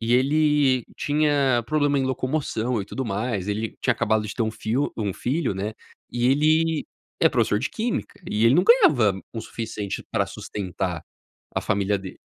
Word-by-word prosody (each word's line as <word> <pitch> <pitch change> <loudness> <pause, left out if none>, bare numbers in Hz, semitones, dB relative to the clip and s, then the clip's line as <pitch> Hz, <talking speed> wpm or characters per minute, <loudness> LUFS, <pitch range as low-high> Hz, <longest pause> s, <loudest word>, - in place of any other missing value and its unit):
E 115 +1 +1
ele 140 -2 +3
tinha 145 -4 +2
problema 145 -1 +2
em 135 - +1
locomoção 130 -3 -1
e 100 - -4
tudo 135 +5 -4
mais, 105 -2 -2
ele 110 +2 -2
tinha - - +2
acabado 110 0 +1
de 100 - -6
ter 120 - 0
1 110 - 0
fio 115 +6 -1
1 105 -4 -1
filho, 135 - -1
né, 100 +3 -3 0.4
e 120 0 +1
ele 155 +2 +2 0.4
é - - +6
professor 105 - +1
de 125 - -2
Química 230 +2 -3
e 105 +2 +1
ele 115 +3 +6
não 180 - +5
ganhava 120 - +5
o 115 - -3
suficiente 110 -4 -5
pra - - +1
sustentar 90 -3 -4 0.5
a - - +1
família 100 0 0
dele. 95 -1 -9
120 Hz, 175 wpm, -24 LUFS, 105-145 Hz, 0.5 s, é